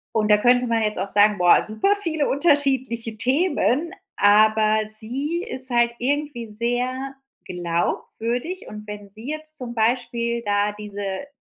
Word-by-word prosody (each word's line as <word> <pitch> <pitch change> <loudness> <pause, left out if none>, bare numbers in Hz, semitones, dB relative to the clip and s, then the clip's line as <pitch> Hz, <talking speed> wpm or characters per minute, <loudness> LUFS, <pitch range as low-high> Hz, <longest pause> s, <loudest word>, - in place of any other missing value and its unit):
Und 215 -1 +1
da 210 - +6
könnte 245 +3 +3
man 230 -1 0
jetzt 210 -2 -1
auch 195 +2 -3
sagen: 205 0 +3
„Boah, 175 -1 +5
super 220 - +1
viele 315 -5 +2
unterschiedliche 265 -6 0
Themen,“ 290 +3 0 0.2
aber 215 +1 +4 0.2
sie 285 +10 -3
ist 260 0 -1
halt 235 0 +2
irgendwie 275 -3 -2
sehr 250 +5 -2 0.3
glaubwürdig 225 - -3
und 210 0 -9
wenn 205 -1 -9
sie 220 +6 -11
jetzt 310 0 -6
zum 240 -2 -6
Beispiel 235 0 -1
da 205 0 0
diese 205 +2 -6
235 Hz, 140 wpm, -22 LUFS, 210-270 Hz, 0.3 s, da